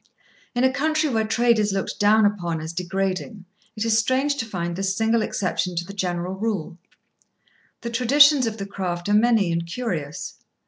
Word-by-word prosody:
In 245 - +1
a 260 0 +3
country 310 +2 +1
where 220 -3 0
trade 230 +1 +3
is 210 -1 +1
looked 195 - -3
down 210 +1 +5
upon 175 -5 -1
as 160 +1 -6
degrading, 190 +3 -3 0.3
it 215 +1 -2
is 225 -1 +3
strange 265 +5 +1
to 225 - -3
find 175 -4 -3
this 195 +1 -1
single 225 +1 +2
exception 180 -3 -2
to 170 0 -2
the 200 - -9
general 180 -2 -2
rule. 190 -5 -3 1.0
The 235 - -5
traditions 270 +3 +5
of 220 -1 -4
the 200 - -5
craft 185 -2 -4
are - - +2
many 215 -4 +3
and 170 0 -1
curious. 170 - -4
205 Hz, 180 wpm, -23 LUFS, 180-230 Hz, 1.0 s, down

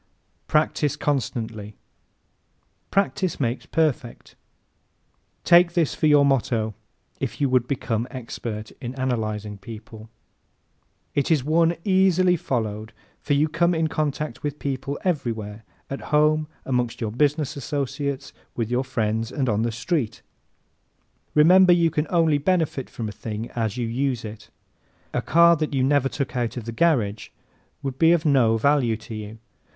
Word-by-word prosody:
Practise 150 -2 +1
CONSTANTLY 115 -7 -3 1.1
¶ - - -43
"Practice 195 -2 0
makes 120 -2 -2
perfect." 150 -6 -1 1.1
Take 175 0 +6
this 170 -4 +1
for 155 - +1
your 145 -1 +6
motto 115 -5 +1 0.5
if - - -4
you 140 - +2
would 125 -1 +2
become 120 -3 -2
expert 115 -4 -6
in 125 0 -5
analyzing 110 -5 -2
people. 110 0 -11 1.0
It 140 - 0
is 155 -6 +3
one 165 +3 +3
easily 185 -2 +4
followed 110 -7 -3 0.3
for 145 - -1
you 150 +2 +3
come 170 +2 +1
in 160 -1 +1
contact 150 -4 -2
with 145 0 -3
people 140 0 -3
everywhere 115 - -2 0.2
at 135 - -5
home, 150 +1 +3 0.2
amongst 125 -3 -1
your 110 -3 -2
business 150 +4 0
associates, 140 0 -3 0.2
with 115 -1 -2
your 125 +2 +1
friends 115 -3 -2
and 135 -3 -1
on 110 -2 +1
the 115 0 0
street. 120 -1 -2 1.1
Remember 180 +4 +7
you 170 -2 +3
can 150 0 -1
only 165 -4 +3
benefit 160 -5 0
from 115 - -5
a - - -5
thing 110 +2 -6
as 110 -2 -2
you 120 -2 -1
use 125 0 -1
it. 110 0 -9 0.6
A - - 0
car 170 +1 +5
that 150 -2 -2
you 130 - +2
never 135 0 +2
took 135 -2 -4
out 120 -1 -2
of 120 - -5
the 115 - -4
garage 115 -7 +1 0.5
would 135 -1 -4
be 165 0 +6
of 170 -1 +1
no 125 -6 +4
value 125 -2 +2
to 110 +1 -10
you. 110 0 -7
135 Hz, 150 wpm, -24 LUFS, 115-155 Hz, 1.1 s, Remember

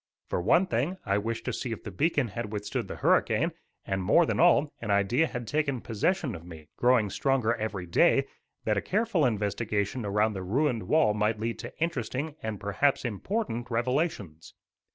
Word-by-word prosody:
For - - -1
one 170 - +4
thing 165 +3 -1
I 100 -1 +1
wished 115 +2 -4
to - - -2
see 125 - -4
if 115 - -5
the 105 - -6
beacon 145 - +1
had 105 +2 -5
withstood 105 -1 -3
the - - -6
hurricane; - - +2 0.3
and, 95 0 -1
more 135 - +4
than - - -1
all, 160 -4 +4
an 115 - -5
idea 100 +10 +3
had 125 -4 -5
taken 140 -1 0
possession 125 - -1
of 85 -3 -8
me, 80 -3 -12
growing 120 -5 +3
stronger 130 -3 +1
every 105 -5 -4
day, 85 - +3 0.4
that 105 -2 +1
a - - +1
careful 200 - +1
investigation 105 +1 -1
around 105 +2 +1
the 95 - -5
ruined 115 +1 0
wall 155 -9 +4
might 105 +1 0
lead 115 +1 -3
to - - -8
interesting, 145 -1 -2
and, 110 -3 -4
perhaps, 130 +8 +1
important 120 - -3
revelations. 120 - -2
115 Hz, 180 wpm, -28 LUFS, 105-145 Hz, 0.4 s, one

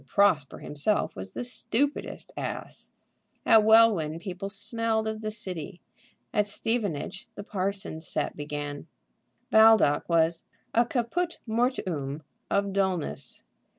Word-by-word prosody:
Prosper 170 -6 +2
himself 150 +9 -1
was 95 0 -8
the - - -3
stupidest 255 +3 -1
ass! - - -6 0.6
At 220 -1 +7
Welwyn 215 -8 +5
people 190 +2 -6
smelled 220 +2 +1
of 220 0 -3
the 215 - -2
City. 185 -5 -4 0.5
At 210 -1 +2
Stevenage 205 -4 -2
the 205 - -7
parsons' 195 -5 -3
set - - -2
began. 145 0 -5 0.6
Baldock 220 -10 +5
was 165 0 +2 0.3
a 235 0 +3
caput 325 +9 -1
mortuum 185 - -1 0.3
of 200 -1 0
dulness. 185 -9 -2
200 Hz, 115 wpm, -27 LUFS, 160-220 Hz, 0.6 s, At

